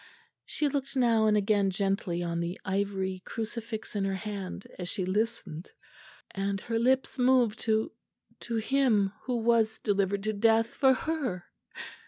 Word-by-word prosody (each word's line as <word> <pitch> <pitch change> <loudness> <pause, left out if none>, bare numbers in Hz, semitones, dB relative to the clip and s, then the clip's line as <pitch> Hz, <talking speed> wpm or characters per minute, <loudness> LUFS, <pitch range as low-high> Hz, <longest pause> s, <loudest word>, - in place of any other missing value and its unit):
She 300 - 0
looked 275 -1 -3
now 230 -3 +4
and 210 0 +4
again 205 -1 +2
gently 195 -2 -1
on 170 -1 -2
the 170 +2 -3
ivory 190 -1 -1
crucifix 225 -1 -5
in 200 - 0
her 195 0 0
hand, 195 -2 -5
as 180 -1 -3
she 190 -4 -2
listened; 190 -4 -2 0.6
and 195 0 -2
her 230 -1 -1
lips 260 +2 +1
moved 250 -4 +3
to 220 -1 +1 0.5
to 235 - -4
Him 225 -4 +2
who 250 - -1
was 225 -1 +3
delivered 200 -1 0
to 215 +1 0
death 225 +2 +3
for 265 -1 +4
her." 260 - -2
215 Hz, 150 wpm, -29 LUFS, 195-235 Hz, 0.6 s, now